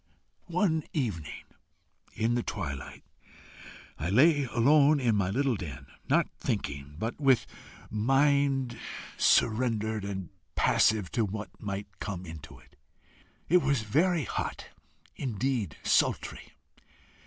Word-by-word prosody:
"One 175 Hz, -2 st, +1 dB
evening, 100 Hz, -, -3 dB, 0.7 s
in 115 Hz, +2 st, +1 dB
the 120 Hz, -, +1 dB
twilight, 75 Hz, -, -5 dB, 1.0 s
I 85 Hz, -, -2 dB
lay 145 Hz, -, +5 dB
alone 140 Hz, +5 st, +4 dB
in 120 Hz, -5 st, +2 dB
my 100 Hz, -3 st, +1 dB
little 130 Hz, +4 st, +1 dB
den, 85 Hz, -9 st, -7 dB, 0.2 s
not -, -, +3 dB
thinking, 70 Hz, +1 st, -3 dB
but 115 Hz, -, -4 dB
with 135 Hz, -3 st, +4 dB, 0.5 s
mind 135 Hz, +1 st, +2 dB, 0.4 s
surrendered 110 Hz, -2 st, +2 dB
and 95 Hz, -2 st, -5 dB, 0.3 s
passive 105 Hz, -4 st, +3 dB
to 115 Hz, -, +1 dB
what 105 Hz, +1 st, -4 dB
might 100 Hz, -1 st, -6 dB
come 95 Hz, -3 st, -5 dB
into 80 Hz, -3 st, -10 dB
it. -, -, -22 dB, 0.7 s
It 180 Hz, -, +5 dB
was 140 Hz, -6 st, +1 dB
very 160 Hz, -, +2 dB
hot -, -, -4 dB, 0.5 s
indeed 120 Hz, -, -2 dB
sultry. -, -, 0 dB
115 Hz, 110 wpm, -29 LUFS, 100-140 Hz, 1.0 s, lay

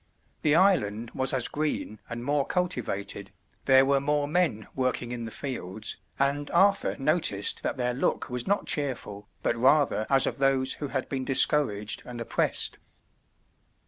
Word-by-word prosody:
The 150 Hz, -1 st, +3 dB
island 120 Hz, -, +2 dB
was 130 Hz, 0 st, +2 dB
as 130 Hz, -3 st, +1 dB
green 145 Hz, -8 st, -3 dB
and 120 Hz, +1 st, -6 dB
more 145 Hz, 0 st, +1 dB
cultivated, 155 Hz, -, -3 dB, 0.3 s
there 130 Hz, 0 st, +6 dB
were 140 Hz, 0 st, +2 dB
more 145 Hz, 0 st, 0 dB
men 155 Hz, -9 st, 0 dB
working 130 Hz, -2 st, -2 dB
in 120 Hz, -1 st, -4 dB
the -, -, -5 dB
fields, 110 Hz, -7 st, -5 dB, 0.2 s
and 140 Hz, +1 st, 0 dB
Arthur 195 Hz, +3 st, +3 dB
noticed 135 Hz, -, +1 dB
that -, -, -3 dB
their 125 Hz, -1 st, 0 dB
look 130 Hz, -, -1 dB
was 125 Hz, -1 st, -3 dB
not 200 Hz, +1 st, +1 dB
cheerful, 115 Hz, -8 st, -3 dB
but -, -, +1 dB
rather 130 Hz, -2 st, +2 dB
as 135 Hz, -1 st, +5 dB
of -, -, -3 dB
those 135 Hz, -1 st, +2 dB
who 145 Hz, -, -2 dB
had 135 Hz, -1 st, -3 dB
been 135 Hz, -2 st, -3 dB
discouraged 130 Hz, -6 st, +2 dB
and 120 Hz, -1 st, -8 dB
oppressed. 115 Hz, -, +1 dB
135 Hz, 155 wpm, -27 LUFS, 120-145 Hz, 0.3 s, there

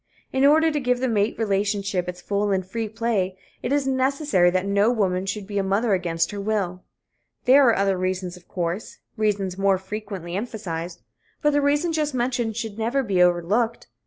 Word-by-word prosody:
In 265 Hz, 0 st, +2 dB
order 315 Hz, +3 st, +5 dB
to 300 Hz, -, -1 dB
give 250 Hz, -2 st, +1 dB
the 260 Hz, -, 0 dB
mate 215 Hz, -2 st, +1 dB
relationship 200 Hz, -3 st, 0 dB
its 180 Hz, 0 st, -8 dB
full 205 Hz, 0 st, 0 dB
and 190 Hz, -2 st, 0 dB
free 220 Hz, +3 st, -4 dB
play, 215 Hz, -4 st, -1 dB, 0.2 s
it -, -, -3 dB
is 285 Hz, -1 st, +2 dB
necessary 265 Hz, -, +2 dB
that 185 Hz, +1 st, 0 dB
no 200 Hz, +2 st, +3 dB
woman 190 Hz, -5 st, 0 dB
should 200 Hz, +1 st, -3 dB
be 205 Hz, 0 st, -2 dB
a -, -, +1 dB
mother 200 Hz, +3 st, +1 dB
against 170 Hz, -2 st, 0 dB
her 205 Hz, -1 st, -5 dB
will. 195 Hz, -4 st, -2 dB, 0.6 s
There 265 Hz, +1 st, +7 dB
are 230 Hz, -, +5 dB
other 195 Hz, -1 st, +1 dB
reasons, 185 Hz, -1 st, -2 dB
of 180 Hz, -1 st, -17 dB
course 175 Hz, +3 st, -4 dB, 0.2 s
reasons 200 Hz, -3 st, -1 dB
more 195 Hz, -1 st, +3 dB
frequently 190 Hz, -3 st, -6 dB
emphasized 185 Hz, -6 st, -5 dB, 0.4 s
but 295 Hz, -, +4 dB
the 290 Hz, -, +3 dB
reason 295 Hz, +4 st, +1 dB
just 300 Hz, -3 st, -1 dB
mentioned 240 Hz, -3 st, -1 dB
should 225 Hz, -2 st, -5 dB
never 240 Hz, +5 st, 0 dB
be 195 Hz, -6 st, +1 dB
overlooked. 180 Hz, +7 st, +1 dB
205 Hz, 190 wpm, -24 LUFS, 185-240 Hz, 0.6 s, There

